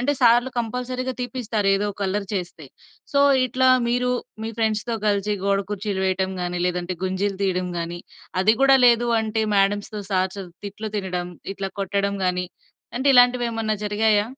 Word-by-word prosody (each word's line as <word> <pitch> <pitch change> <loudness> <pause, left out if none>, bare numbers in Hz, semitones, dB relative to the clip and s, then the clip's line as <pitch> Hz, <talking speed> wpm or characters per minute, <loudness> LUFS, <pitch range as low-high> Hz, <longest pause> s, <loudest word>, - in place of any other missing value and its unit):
అంటే, 285 +4 +1
సార్లు 240 +1 +5
కంపల్సరీగా 250 +2 -3
తీపిస్తారు 230 -4 -2
ఏదోక 205 0 -2
అల్లరి 200 +1 -2
చేస్తే. 175 -4 -5 0.5
సో, 280 - +3 0.3
ఇట్లా 260 +2 +2 0.2
మీరు, 250 +1 +1 0.3
మీ 225 - -3
ఫ్రెండ్స్‌తో 220 +1 0
కలిసి 205 0 +1
గోడ 200 0 +2
కుర్చీలు 205 -1 -2
వేయడం 190 0 0
గాని, 175 0 -2
లేదంటే 180 0 -2
గుంజీలు 190 +1 -1
తీయడం 185 -1 0
గాని, 170 +1 -4 0.4
అది 215 +4 +4
గుడా 270 0 +6
లేదు 240 0 +4
అంటే, 220 0 -1
మాడమ్స్‌తో, 205 +2 +1
సార్స్‌తొ 190 +1 -1 0.2
తిట్లు 210 +2 -6
తినడం, 180 -3 -3 0.2
ఇట్లా 195 0 -4
కొట్టడం 200 +1 -1
గాని 180 0 0 0.5
అంటే, 260 +3 +1
ఇలాంటివి 245 0 +5
ఏమన్నా 225 -1 -1
జరిగాయా? 210 0 +2
205 Hz, 150 wpm, -23 LUFS, 190-235 Hz, 0.5 s, గుడా